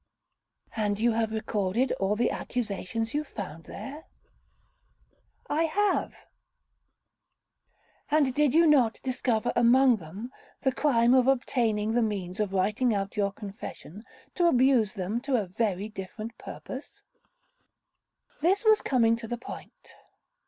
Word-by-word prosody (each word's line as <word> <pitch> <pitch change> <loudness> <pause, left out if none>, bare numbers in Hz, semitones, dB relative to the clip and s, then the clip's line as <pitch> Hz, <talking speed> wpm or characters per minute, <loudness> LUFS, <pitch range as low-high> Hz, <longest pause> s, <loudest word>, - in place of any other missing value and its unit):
'And 205 -2 -1
you 235 +2 +3
have 225 -1 0
recorded 220 +2 -1
all 195 +2 +1
the 235 +3 +1
accusations 225 -1 -3
you 295 +1 0
found 180 - -8
there?' 295 +4 -8 1.4
'I 310 +3 +1
have.' 405 +6 0 1.9
'And 305 -1 +4
you 260 - -2
did 295 0 +2
not 255 -7 +4
discover 250 -4 0
among 240 +1 +5
them 195 +8 -9 0.3
the 265 - +2
crime 245 -4 +3
of 260 -1 +4
obtaining 225 -5 +1
the 240 - +3
means 195 -4 -3
of 210 -2 0
writing 210 +5 +1
out 195 0 -3
your 200 -2 +1
confession, 200 -1 -9 0.3
to 350 -1 +2
abuse 250 - +3
them 200 +5 -2
to 275 0 0
a 215 -5 +1
very 195 +1 -2
different 215 +2 -7
purpose?'—This 465 -6 -7
was 435 -1 +5
coming 230 -4 +3
to 230 -1 -8
the 240 - -3
point. 235 - -11
230 Hz, 125 wpm, -28 LUFS, 210-265 Hz, 1.9 s, among